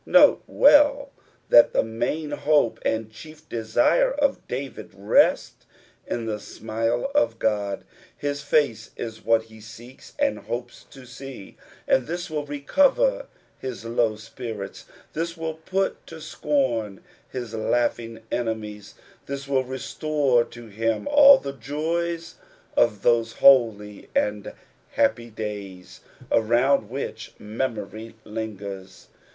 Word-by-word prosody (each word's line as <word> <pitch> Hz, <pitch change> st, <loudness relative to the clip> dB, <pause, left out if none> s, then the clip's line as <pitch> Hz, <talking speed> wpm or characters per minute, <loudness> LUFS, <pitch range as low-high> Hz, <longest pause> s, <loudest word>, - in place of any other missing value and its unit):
Note -, -, +6 dB
well 285 Hz, -1 st, +5 dB, 0.4 s
that 120 Hz, -, +7 dB
the -, -, +3 dB
main 145 Hz, +7 st, -3 dB
hope 145 Hz, -4 st, +2 dB
and 110 Hz, -1 st, -1 dB
chief 155 Hz, +7 st, -13 dB
desire 120 Hz, -, +2 dB
of 285 Hz, -, -1 dB
David 135 Hz, +2 st, -6 dB
rest 100 Hz, +1 st, +2 dB, 0.4 s
in 115 Hz, -, -3 dB
the 105 Hz, -2 st, -3 dB
smile 115 Hz, +3 st, -2 dB
of 115 Hz, -1 st, +2 dB
God. 105 Hz, -3 st, -1 dB, 0.3 s
His 145 Hz, 0 st, -3 dB
face 115 Hz, -10 st, +1 dB
is 110 Hz, -1 st, -6 dB
what 115 Hz, -1 st, +3 dB
he 110 Hz, -1 st, -16 dB
seeks 115 Hz, +4 st, -13 dB
and 285 Hz, -1 st, +1 dB
hopes 120 Hz, 0 st, -6 dB
to 135 Hz, -2 st, -14 dB
see, 125 Hz, -4 st, -10 dB, 0.3 s
and 130 Hz, -, +2 dB
this 175 Hz, 0 st, -4 dB
will 150 Hz, -1 st, -3 dB
recover 285 Hz, -, +2 dB, 0.3 s
his 130 Hz, -3 st, -6 dB
low 115 Hz, -1 st, +1 dB
spirits, 110 Hz, -2 st, -8 dB, 0.3 s
this 165 Hz, +1 st, -3 dB
will 160 Hz, -1 st, -3 dB
put 185 Hz, +5 st, -3 dB
to 165 Hz, -, -10 dB
scorn 130 Hz, -, -1 dB, 0.3 s
his 120 Hz, -3 st, -6 dB
laughing 115 Hz, 0 st, -1 dB
enemies, 110 Hz, -3 st, -4 dB, 0.3 s
this 140 Hz, 0 st, -5 dB
will 135 Hz, -2 st, +1 dB
restore 130 Hz, 0 st, 0 dB
to 120 Hz, 0 st, -12 dB
him 115 Hz, -, -2 dB
all 285 Hz, -1 st, +8 dB
the 140 Hz, -, -6 dB
joys 165 Hz, +6 st, -3 dB, 0.4 s
of 105 Hz, -4 st, +2 dB
those 115 Hz, -1 st, +2 dB
holy 110 Hz, -6 st, +4 dB
and 105 Hz, -1 st, 0 dB, 0.4 s
happy 120 Hz, 0 st, +1 dB
days 105 Hz, -4 st, -7 dB, 0.3 s
around 120 Hz, +1 st, +3 dB
which 120 Hz, -3 st, -6 dB
memory 110 Hz, 0 st, -5 dB
lingers. 100 Hz, -3 st, -7 dB
120 Hz, 125 wpm, -24 LUFS, 110-150 Hz, 0.4 s, all